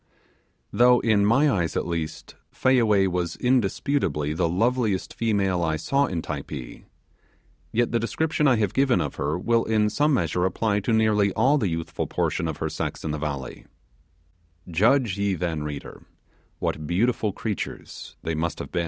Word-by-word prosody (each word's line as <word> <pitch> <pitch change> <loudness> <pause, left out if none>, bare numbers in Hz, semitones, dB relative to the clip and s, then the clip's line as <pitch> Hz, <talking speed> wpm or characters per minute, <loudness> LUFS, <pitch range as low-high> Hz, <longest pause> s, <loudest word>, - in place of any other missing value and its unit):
Though 125 0 +5
in 105 -3 +3
my 135 +7 +4
eyes, 90 - 0
at - - -1
least, 85 -2 -4 0.2
Fayaway 115 -7 +3
was 90 -2 -2
indisputably 105 - 0
the 85 +1 0
loveliest 110 +1 0
female 100 -5 0
I 80 -2 0
saw 140 - +1
in 85 -7 -3
Typee, 70 -4 -7 0.9
yet 120 +1 +1
the 115 - +1
description 150 +6 0
I 130 - +5
have 105 -4 0
given 135 -2 +3
of - - -3
her 75 +2 -1
will 115 +5 +1
in 105 -1 +1
some 150 +6 +2
measure 90 -1 0
apply 100 +2 0
to 100 - -1
nearly 110 -2 +3
all 145 +3 +3
the 105 - 0
youthful 80 0 -3
portion - - -1
of 80 - -4
her - - -2
sex - - -4
in 80 - -2
the 75 - -3
valley. 70 -3 -5 1.0
Judge 105 - +2
ye 100 -1 +1
then, 80 -3 -2
reader, 75 -2 -7 0.5
what 75 -1 -3
beautiful 110 +4 +1
creatures 105 +1 -6
they 80 - -2
must 80 +2 -2
have - - -7
been. 90 - -1
100 Hz, 165 wpm, -25 LUFS, 85-120 Hz, 1.0 s, Though